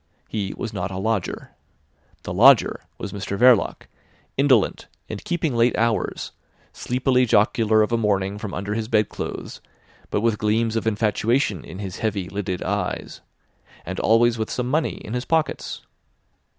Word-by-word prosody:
He 100 -3 -3
was 115 -2 -5
not 95 -1 -3
a 95 - -6
lodger. 105 -1 -2 0.7
The - - -5
lodger 120 +6 +6 0.2
was 105 - -6
Mr 100 0 -4
Verloc, 125 -2 +4 0.5
indolent, 130 -6 +2 0.2
and 105 - -6
keeping 165 -6 -1
late 115 +1 +3
hours, 115 0 -1 0.4
sleepily 125 0 +1
jocular 110 +1 +3
of 105 - -2
a 115 - +2
morning 100 -2 0
from 105 -2 -5
under 100 +3 -3
his 110 0 -2
bed 110 -2 +2
clothes, - - -6 0.5
but - - 0
with 115 -2 +1
gleams 110 +1 +1
of 115 0 -1
infatuation 110 0 +1
in 90 - -9
his 95 -2 -6
heavy 105 -4 -1
lidded 95 -3 -3
eyes, - - -3 0.6
and 95 +2 -4
always 115 +1 +3
with 110 - -2
some 125 0 -2
money 155 +2 +1
in 110 - -6
his 125 +1 -2
pockets. 160 -1 -1
110 Hz, 155 wpm, -23 LUFS, 100-120 Hz, 0.7 s, lodger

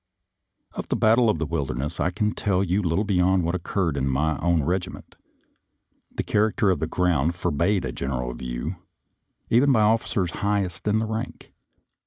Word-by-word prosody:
Of - - -6
the - - +1
battle 115 +1 +4
of 105 - +1
the 80 - -2
Wilderness 75 0 -3
I - - +2
can 105 +4 -1
tell 95 -3 0
you 95 +2 +1
little 85 +2 0
beyond 95 -2 +2
what 85 +1 -1
occurred 90 -2 -1
in 65 0 0
my 75 +4 +1
own 85 -3 +2
regi 90 +4 -1
ment; - - -12 1.0
the - - -3
character 105 -1 +2
of 90 - 0
the 80 - -1
ground 85 -2 +1
forbade 90 +4 0
a - - -3
general 60 -2 -3
view, 60 +8 -5 0.7
even 130 +5 +5
by 115 -4 +4
officers 105 -4 +1
highest 100 -3 -1
in 110 +1 +2
rank. 110 0 -5
90 Hz, 170 wpm, -24 LUFS, 80-105 Hz, 1.0 s, even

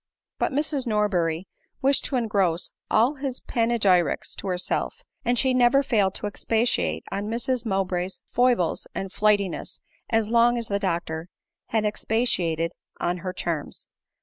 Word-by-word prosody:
But - - +1
Mrs 285 -2 0
Norbeny 185 -6 +1 0.4
wished 275 +1 +3
to 275 - -2
engross 200 -8 +1 0.2
all 245 +7 +3
his 265 -2 -3
panegyrics 210 -8 +2
to - - -6
herself, 185 - -1 0.2
and 245 -1 +1
she 260 0 +3
never 255 +2 +4
failed 205 -7 +2
to - - -4
expatiate 205 - 0
on 205 +1 -2
Mrs 235 +1 -1
Mowbray's 190 -2 -1
foibles 245 -9 +1
and 195 -1 -4
flightiness 205 -3 +1 0.3
as 225 -2 +2
long 235 +1 +4
as 230 -1 -3
the 200 0 0
doctor 170 -4 -2 0.4
had 220 -1 +1
expatia 210 -5 0
ted 165 +1 -1 0.3
on 175 +1 0
her 185 +1 -4
charms. 170 -4 -4
210 Hz, 145 wpm, -25 LUFS, 180-240 Hz, 0.4 s, never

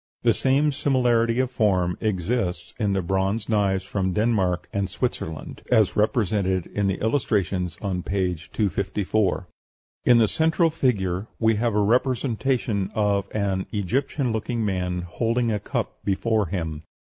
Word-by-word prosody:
The - - +5
same 140 +3 +2
similarity 125 -4 +2
of 130 -1 +1
form 95 -7 +1
exists 95 -3 -1
in 105 -3 +1
the 95 -1 0
bronze 95 +4 0
knives 100 -3 +1
from 95 -1 -1
Denmark 100 -5 +1
and 100 -1 -1
Switzerland, 90 - -4
as 110 -5 +4
represented 100 -5 +1
in 100 -1 -1
the 95 - -1
illustrations 100 - 0
on 95 -3 -1
p. 95 -1 0 0.2
254. 100 -1 0 0.6
In 120 - +6
the 115 -2 +5
central 160 - +2
figure 100 - 0
we 110 -1 +3
have 115 -1 0
a - - +3
representation 120 -3 +1
of 100 -2 +1
an 95 -3 -1
Egyptian 125 - -1
looking 110 +1 -2
man 90 -2 -1
holding 115 +6 0
a 105 - 0
cup - - -4
before 105 +1 +1
him. 80 -4 -3
105 Hz, 140 wpm, -24 LUFS, 95-115 Hz, 0.6 s, In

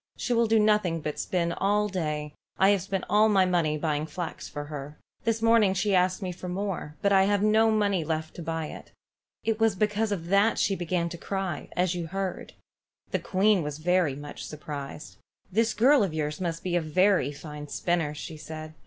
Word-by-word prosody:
She 245 - -1
will 230 -1 +3
do 225 +1 +4
nothing 210 -6 +3
but 150 0 -4
spin 170 -2 0
all 205 +3 +1
day, 155 -6 -2
and 150 - -10 0.3
I - - +6
have 200 -2 +2
spent 190 +1 -3
all 210 +3 +4
my 195 -3 +4
money 170 -4 +1
buying 150 0 -1
flax 165 +1 -6
for 145 - -5
her. 145 0 -7 0.3
This 225 0 0
morning 225 -4 +4
she 200 +1 +1
asked 185 +2 +2
me 185 - -2
for 180 +1 -7
more, 180 -5 -3
but 200 0 +4
I 190 0 +5
have 205 0 +2
no 220 +1 +4
money 205 -5 +2
left 160 0 -3
to - - -5
buy 165 0 -3
it. - - -10 0.5
It 225 -1 0
was 225 -2 +3
because 210 +2 0
of 175 -5 -2
that 200 +3 +4
she 195 - +2
began 175 -1 -1
to 170 -1 -8
cry, 190 -6 -3
as 180 0 +1
you 175 -2 -4
heard." 195 +1 -4 0.6
The - - 0
Queen 195 0 +2
was 150 -1 -4
very 170 -3 +1
much 145 +1 -8
surprised. 150 -1 -7 0.3
"This 225 +3 +1
girl 270 +4 +5
of 185 -6 -1
yours 150 +1 -2
must 170 -2 -3
be 180 -1 -1
a 175 - +2
very 180 -1 +2
fine 150 0 -8
spinner," 160 0 -1
she 155 +1 -7
said. 155 0 -8
180 Hz, 205 wpm, -27 LUFS, 155-205 Hz, 0.6 s, I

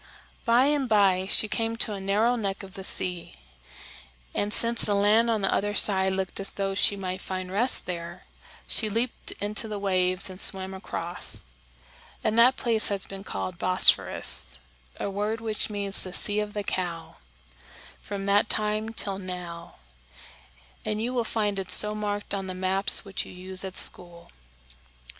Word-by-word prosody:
"] - - -31
By 240 +2 +4
and 285 -3 0
by 195 -3 +2
she 215 - +4
came 225 +1 -2
to 225 -2 0
a 195 - -7
narrow 210 +5 +1
neck 200 -4 -4
of 190 -1 -11
the 190 - -8
sea, 180 - -1 1.0
and, 205 - -2
since 230 +1 +4
the 205 - +3
land 210 +4 +3
on 220 -2 0
the 195 - 0
other 205 +1 -1
side 190 -2 +5
looked 190 0 -2
as 195 - +2
though 195 -1 -3
she 200 +1 +3
might 185 -1 -5
find 185 -1 -6
rest 230 +7 +1
there, 170 0 -7 0.4
she 220 - +1
leaped 230 +3 -2
into 210 +2 -1
the 210 -1 -5
waves 185 -2 0
and 185 0 -6
swam 190 0 -2
across; 175 - -3 0.8
and 220 - 0
that 250 +3 +5
place 225 -2 +1
has 200 -2 -2
been 195 0 -9
called 185 -3 -6
Bosphorus 185 - +4 0.4
a - - -3
word 210 +3 -3
which 220 -1 -2
means 200 -1 0
the 185 - -7
Sea 205 +1 +2
of 210 0 -4
the 205 - -3
Cow 175 -4 -5 0.8
from 200 -1 -6
that 200 +2 +2
time 215 +1 +1
till 195 -3 -1
now, 180 -2 -8 1.1
and 215 - -3
you 240 +3 -3
will 245 -2 0
find 210 -3 -2
it 190 - -6
so 210 0 +6
marked 205 -1 -4
on 195 -1 -4
the 185 - -6
maps 190 +3 +1
which 195 -1 -3
you - - -12
use 185 +1 -4
at 190 -1 -5
school. 175 -1 -5
200 Hz, 175 wpm, -26 LUFS, 185-215 Hz, 1.1 s, so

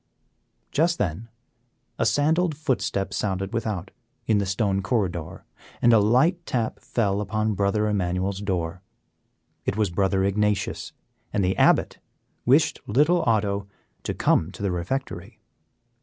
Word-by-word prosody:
Just 170 +3 +2
then 105 +4 -3 0.7
a - - +3
sandaled 155 +2 +2
footstep 120 -10 -1
sounded 95 0 -2
without, 105 -5 -3 0.3
in 110 -2 +3
the 100 - -1
stone 95 0 0
corridor, 95 -5 -2 0.3
and 120 - +5
a 110 - +7
light 130 - +3
tap 115 -3 -1
fell 105 -3 -1
upon 110 +1 -1
Brother 100 +2 +1
Emmanuel's 95 -1 -1
door. 90 -3 -2 0.8
It - - -2
was 105 -4 +1
Brother 95 +1 +1
Ignatius, 100 0 0 0.4
and 100 - +1
the 95 - +1
Abbot - - +3 0.5
wished 150 +4 +4
little 150 +10 +3
Otto 100 -3 0 0.3
to - - -3
come 80 +3 +2
to - - -8
the 100 - +1
refectory. 90 +11 -4
105 Hz, 130 wpm, -25 LUFS, 95-120 Hz, 0.8 s, a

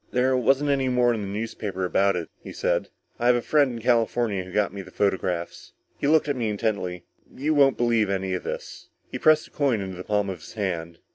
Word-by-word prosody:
"There 130 +1 +2
wasn't 135 +4 +2
any 135 -2 +1
more 125 -1 +3
in 110 - -3
the 100 - -4
newspapers 100 -2 -4
about 100 +2 +2
it," 85 -2 -4
he - - -9
said. - - -1 0.3
"I 120 - +1
have 125 - +6
a 120 - 0
friend 145 -4 +3
in 115 - -6
California 115 -4 +1
who 90 - -11
got 105 +1 0
me 100 - -5
the - - -12
photographs." 90 -4 -2 0.3
_He 140 - +2
looked 155 -1 +4
at 145 - 0
me 115 -3 -1
intently. 100 -4 -2 0.3
"You 150 +4 -1
won't 140 -2 +4
believe 115 -3 +2
any 95 -1 -1
of 90 - -2
this." - - -7 0.2
He - - -4
pressed 155 0 +4
the - - -19
coin 135 -7 +1
into 95 -2 -5
the 90 - -6
palm 105 0 0
of 95 -3 -5
his 80 - -12
hand. 85 -5 -3
110 Hz, 230 wpm, -25 LUFS, 95-125 Hz, 0.3 s, have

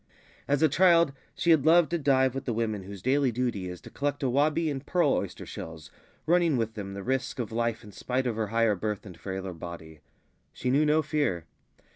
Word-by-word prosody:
As 145 +2 +2
a - - +7
child 170 -1 +4 0.2
she 170 - +2
had 155 -4 +5
loved 165 +1 +5
to 170 - 0
dive 130 -3 +3
with 135 - -5
the 120 - -1
women 110 -3 -1
whose 95 0 -10
daily 135 0 +2
duty 115 -6 -2
is 90 -1 -7
to - - -12
collect 145 0 -2
awabi 150 +5 +2
and 135 -1 -5
pearl 175 +3 +2
oyster - - -3
shells, 80 -1 -9 0.3
running 170 -3 +3
with 115 -1 -1
them 100 -3 -6
the 100 - -6
risk 130 +1 -2
of 120 -4 -4
life 115 0 -1
in 105 - -12
spite 130 +5 -2
of 120 -3 -1
her 110 -1 -1
higher 115 0 +2
birth 105 +1 -3
and 90 -4 -11
frailer 95 -1 -5
body. 80 -2 -9 0.5
She 125 - -2
knew 150 +3 +3
no 155 +1 +3
fear. 145 - -1
125 Hz, 210 wpm, -28 LUFS, 100-145 Hz, 0.5 s, a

